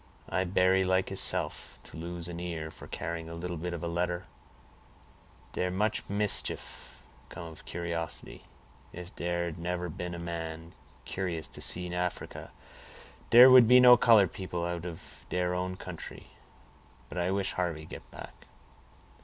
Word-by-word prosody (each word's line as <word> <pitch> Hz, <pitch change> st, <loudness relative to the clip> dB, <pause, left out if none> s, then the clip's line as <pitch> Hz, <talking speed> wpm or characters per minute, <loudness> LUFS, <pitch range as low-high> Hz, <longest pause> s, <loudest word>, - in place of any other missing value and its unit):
"I 95 Hz, 0 st, 0 dB
berry 95 Hz, +1 st, +3 dB
like 95 Hz, 0 st, +1 dB
heself 95 Hz, -, -1 dB
to -, -, -12 dB
lose 85 Hz, +1 st, -5 dB
an 85 Hz, -1 st, -6 dB
ear 80 Hz, -3 st, -4 dB
for -, -, -12 dB
carrying 80 Hz, 0 st, -5 dB
a 85 Hz, -, -7 dB
little 90 Hz, +1 st, -4 dB
bit 85 Hz, +2 st, -4 dB
of 85 Hz, -1 st, -5 dB
a -, -, -1 dB
letter; 85 Hz, +2 st, -1 dB, 1.3 s
dere 90 Hz, -, -1 dB
much 105 Hz, +4 st, 0 dB
mischief 105 Hz, 0 st, -1 dB, 0.3 s
come 85 Hz, -1 st, -8 dB
of 80 Hz, -, -14 dB
curiosity. 85 Hz, -1 st, -5 dB, 0.5 s
If 90 Hz, +1 st, -9 dB
dere 85 Hz, 0 st, -1 dB
had 85 Hz, -1 st, -6 dB
nebber 90 Hz, +1 st, -3 dB
been 90 Hz, +2 st, -5 dB
a -, -, -6 dB
man 85 Hz, -1 st, -6 dB, 0.3 s
curious 85 Hz, -4 st, -3 dB
to -, -, -9 dB
see 90 Hz, 0 st, +1 dB
Africa, 90 Hz, 0 st, -4 dB, 0.8 s
dere 125 Hz, +2 st, +10 dB
would 130 Hz, -3 st, +9 dB
be 125 Hz, +2 st, +8 dB
no 125 Hz, -1 st, +9 dB
color 115 Hz, -5 st, +6 dB
people 90 Hz, -1 st, -4 dB
out 85 Hz, -1 st, -3 dB
of 85 Hz, -2 st, -11 dB
dere 90 Hz, 0 st, 0 dB
own 90 Hz, +1 st, -2 dB
country; -, -, -9 dB, 0.8 s
but 90 Hz, -, -5 dB
I 90 Hz, +1 st, 0 dB
wish 95 Hz, 0 st, 0 dB
Harvey 85 Hz, -4 st, -2 dB
get -, -, -10 dB
back." -, -, -12 dB
90 Hz, 155 wpm, -30 LUFS, 85-95 Hz, 1.3 s, dere